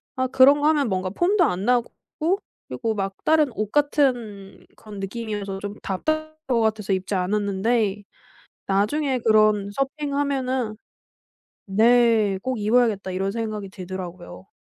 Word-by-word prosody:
아 260 0 0
그런 270 +3 +6
거 300 - +3
하면 290 -6 +2
뭔가 185 0 -1
폼도 355 - +2
안 190 -5 -2
나고 245 -1 +2 0.8
그리고 225 -3 -2
막 195 -1 -2
다른 310 -3 +4
옷 215 -1 -3
같은 245 -9 0
그런 210 -2 -10
느낌이어서 205 -1 -4
좀 205 0 -5
답답할 310 +10 -2
것 240 -3 +2
같아서 215 -3 0
입지 190 +1 -2
않았는데 205 +2 0 0.6
나중에 250 +8 +1
그런 215 -2 +3
'서핑하면은' 275 -4 -2 0.9
네 220 -1 +4
'꼭 255 -3 -2
입어야겠다.' 215 -3 +1
이런 195 +2 -1
생각이 215 -3 -4
들더라고요. 180 - -8
215 Hz, 285 characters per minute, -23 LUFS, 195-260 Hz, 0.9 s, 그런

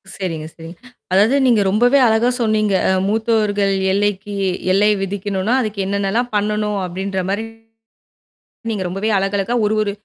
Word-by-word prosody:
சரிங்க, 165 -5 -4
சரிங்க. 165 +1 -11 0.4
அதாவது 215 +8 +4
நீங்க 230 -5 +4
ரொம்பவே 245 +7 +3
அழகா 225 +2 +2
சொன்னீங்க. 215 -2 +1 0.2
அ - - +3 0.2
மூத்தோர்கள் 210 -2 +1 0.2
எல்லைக்கி 205 0 -1 0.4
எல்லை 205 +2 +3
விதிக்கணும்னா 200 +2 -2
அதுக்கு 215 -3 -4
என்னனெல்லாம் 200 +5 -1
பண்ணணும் 210 0 0
அப்படின்ற 190 +1 -3
மாரி 205 +3 -1 1.4
ரொம்பவே 195 +5 -2
அழகா 195 +1 -1
அழகா 215 +5 -2
ஒரு 210 - +1
ஒரு 205 -1 -1
205 Hz, 130 wpm, -18 LUFS, 195-220 Hz, 1.4 s, அதாவது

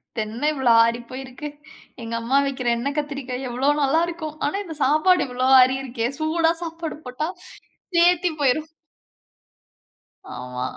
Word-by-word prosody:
இதென்ன 225 +6 -2
இவ்ளோ 265 -4 +3
ஆடி 235 +1 0
போயிருக்கு. 260 +2 -7 0.5
எங்க 230 0 -5
அம்மா 240 +4 0
வைக்கிற 260 -3 -2
எண்ணெ 245 +4 -2
கத்திரிக்காய 270 -3 -4
எவ்ளோ 255 +3 0
நல்லாருக்கும். 315 +1 0
ஆனா 295 - -1
இந்த 325 -4 -7
சாப்பாடு 310 +6 +3
இவ்ளோ 250 +1 -1
ஆறி 255 +1 +5
இருக்கே 240 -3 -2
சூடா 325 +1 +2
சாப்பாடு 330 -1 -5
போட்டா 250 +5 -3 0.7
சேத்தி 350 +1 +4
போய்ரும். 295 +4 +1 1.6
ஆமா. 125 0 -5
275 Hz, 130 wpm, -23 LUFS, 250-315 Hz, 1.6 s, ஆறி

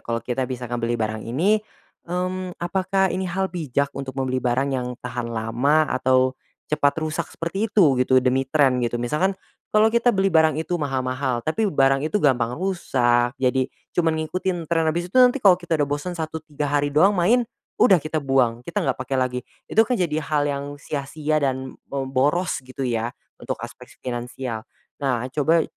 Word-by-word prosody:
kalau 115 0 -3
kita 125 +1 -2
bisa 125 -1 -5
ngebeli 120 0 -2
barang 110 -1 -2
ini, 185 - +2 0.5
mmm, 185 0 -3
apakah 190 +2 0
ini 185 0 -2
hal 190 +1 -2
bijak 140 -5 -1
untuk 135 -1 -6
membeli 130 -1 -1
barang 130 +3 0
yang 125 -1 -3
tahan 120 -1 -4
lama, 115 +6 +1 0.2
atau 130 0 +3 0.4
cepat 145 -1 +3
rusak 155 0 -2
seperti 195 +7 -3
itu 185 -10 +5
gitu, 130 0 +3
demi 130 +1 +1
tren, 135 -4 +3
gitu. 120 0 -1
Misalkan, 150 +11 0 0.3
kalau 215 +1 +4
kita 235 +1 +3
beli 195 -1 +2
barang 160 -2 +4
itu 170 +2 -2
mahal-mahal, 130 -3 -1
tapi 210 +7 0
barang 135 -3 +3
itu - - 0
gampang 125 -4 +2
rusak, 125 -9 +1
jadi, 130 0 +1 0.2
cuman 165 -2 +1
ngikutin 180 +1 -2
tren 165 0 +1
habis 175 +3 -2
itu - - -2
nanti 250 +2 +6
kalau 185 -3 +8
kita 170 -2 -1
udah 145 -2 0
bosan, 145 +5 -3
1, 160 -1 -4
3 145 -1 -3
hari 145 0 +2
doang 180 +8 +5
main, 230 +8 +3 0.4
udah 195 -6 +7
kita 155 0 -2
buang, 130 -4 +1
kita - - -3
nggak 135 -2 0
pakai 135 +1 -2
lagi. 130 -1 0 0.2
Itu 220 - +2
kan 250 - +1
jadi 160 -4 0
hal 150 -1 0
yang 140 -1 -2
sia-sia 150 +2 -2
dan, 130 -1 -2 0.2
mmm, 135 -1 -3
boros 145 +6 +1
gitu 130 +1 -6
ya, 115 -1 -1 0.3
untuk - - -3
aspek - - -11 0.2
finansial. 120 -2 -5 0.3
Nah, 125 -4 0
coba 160 +2 +3
140 Hz, 180 wpm, -23 LUFS, 130-175 Hz, 0.5 s, kalau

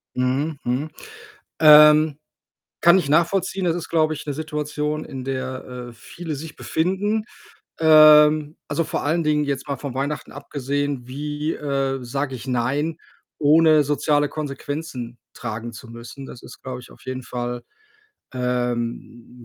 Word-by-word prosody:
Mhm, 135 +4 0
mhm. 130 +6 -1 0.7
Ähm, 150 -1 +7 0.6
kann 175 +2 +7
ich 170 -7 -1
nachvollziehen. 185 +4 +1
Das 170 -2 +1
ist, 175 - -6
glaube 155 -1 +2
ich, 155 - -8
'ne 145 - -3
Situation, 150 0 -3
in 130 -1 -7
der, 130 -1 -5
äh, - - -13
viele 160 +7 -7
sich 155 +2 -8
befinden. 195 +6 -1 0.6
Ähm, 155 -1 +6
also, 165 - 0
vor - - -3
allen 165 +3 +1
Dingen 150 -1 +1
jetzt 140 0 -3
mal 140 -1 -3
von 140 -3 -6
Weihnachten 140 +3 -3
abgesehen, 140 -2 -3
wie, 150 +3 -3
äh, 135 -2 -2
sage 135 +2 -3
ich: 125 +1 -9
„Nein”, 135 +6 -1 0.4
ohne 155 +1 +5
soziale 145 +1 +1
Konsequenzen 145 -4 -5 0.2
tragen 115 +2 -6
zu 115 - -11
müssen? 120 +4 -10
Das 125 - -11
ist, - - -13
glaube 130 -1 -6
ich, 125 - -15
auf - - -18
jeden 130 0 -5
Fall, 120 0 -5 0.7
ähm, 120 -1 -3
145 Hz, 145 wpm, -22 LUFS, 130-155 Hz, 0.7 s, Ähm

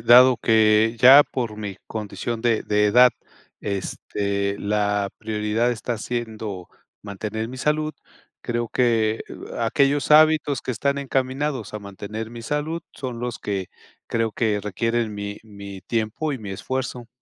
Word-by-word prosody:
dado 125 +1 +7
que 110 0 +4
ya 135 +3 +9
por 115 -7 -4
mi 100 -3 -5
condición 110 +2 -4
de 115 -2 +1
de 105 0 +2
edad, 125 +4 +6 0.5
este, 100 0 -2
la 105 -1 0
prioridad 110 +2 0
está 120 0 -3
siendo 110 -6 -5 0.3
mantener 105 +2 -4
mi 130 +1 -8
salud, 155 +2 0 0.5
creo 120 -1 -2
que 115 -3 +2 0.4
aquellos 140 +5 +2
hábitos 155 -3 +5
que - - -3
están 140 +4 0
encaminados 135 -2 -2
a - - -2
mantener 105 +2 -7
mi 120 0 -8
salud 150 +6 -2
son 125 -3 -5
los 120 -2 -3
que 100 -2 -3 0.4
creo 115 -1 -1
que 105 -3 +1
requieren 115 +3 -1
mi 100 0 -5
mi 100 -3 -10
tiempo 115 - -2
y 135 - -4
mi 105 -3 -8
esfuerzo. 125 +4 -4
115 Hz, 140 wpm, -23 LUFS, 105-125 Hz, 0.5 s, ya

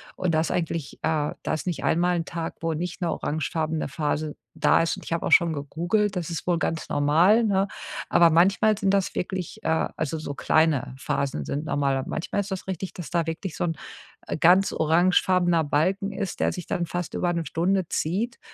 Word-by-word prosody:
Und 185 -2 0
da 155 - +3
ist 165 - -1
eigentlich 165 -4 -2
äh, 155 -2 0
da - - -1
ist 155 - -3
nicht 175 - -2
einmal 175 +2 +2
'n 165 - -2
Tag, 165 -1 -5
wo 165 0 0
nicht 175 +4 -4
'ne 170 -2 0
orangefarbene 155 +1 -2
Phase 150 +1 -2 0.2
da - - +4
ist 165 - 0
und - - -11
ich - - -3
habe 165 - -1
auch - - -3
schon 170 -1 +5
gegoogelt, 175 +8 -1
das 175 -2 -3
ist 165 - -5
wohl 175 -1 +2
ganz 165 -1 -2
normal, 165 +10 +4
ne? 195 -2 +2 0.4
Aber 170 -1 +5
manchmal 195 +6 +4
sind 195 -2 +1
das 195 -2 0
wirklich, 185 +3 -4
äh 160 - +1
also, 160 0 -2
so 155 -2 -5
kleine 145 -3 +1
Phasen 135 - -2
sind 145 - -3
normal. 140 -2 +1
Aber 135 - -4
manchmal 175 +5 -2
ist 200 - -7
das 190 - -4
richtig, 190 0 -4
dass 175 - -8
da 170 -2 0
wirklich 165 +1 -4
so - - -1
'n, 165 -1 -1 0.5
äh, - - -2
ganz 180 +5 +5
orangefarbener 175 +1 +3
Balken 185 +7 0
ist, 200 -2 -4
der - - +2
sich 180 - -6
dann 175 - -1
fast 175 +1 -4
über 175 - 0
1 170 -1 -2
Stunde 180 +5 0
zieht, 205 +10 -1
165 Hz, 210 wpm, -25 LUFS, 155-185 Hz, 0.5 s, schon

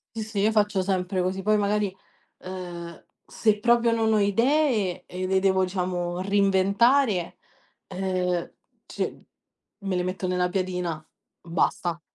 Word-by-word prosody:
Sì, 220 - -3
sì, 215 -2 -4
io 210 +2 +3
faccio 210 -3 +2
sempre 185 -1 -1
così. 185 +1 -1
Poi 215 +1 +3
magari, 205 -1 0 0.4
ehm, 175 -2 -8 0.2
se 215 -2 +1
proprio 235 +1 +3
non 225 -1 +2
ho 215 - +3
idee, 220 - +1
e 185 +1 -4
le 190 0 +2
devo 190 -1 +2
diciamo 180 -1 -2
reinventare, 200 +2 +2 0.5
uhm, 180 -2 -1 0.3
c - - -3 0.6
me 195 -2 -2
le 180 - 0
metto 185 0 -3
nella 180 0 +1
piadina, 180 -4 -3 0.4
basta. 170 +1 -1
190 Hz, 135 wpm, -25 LUFS, 180-210 Hz, 0.6 s, io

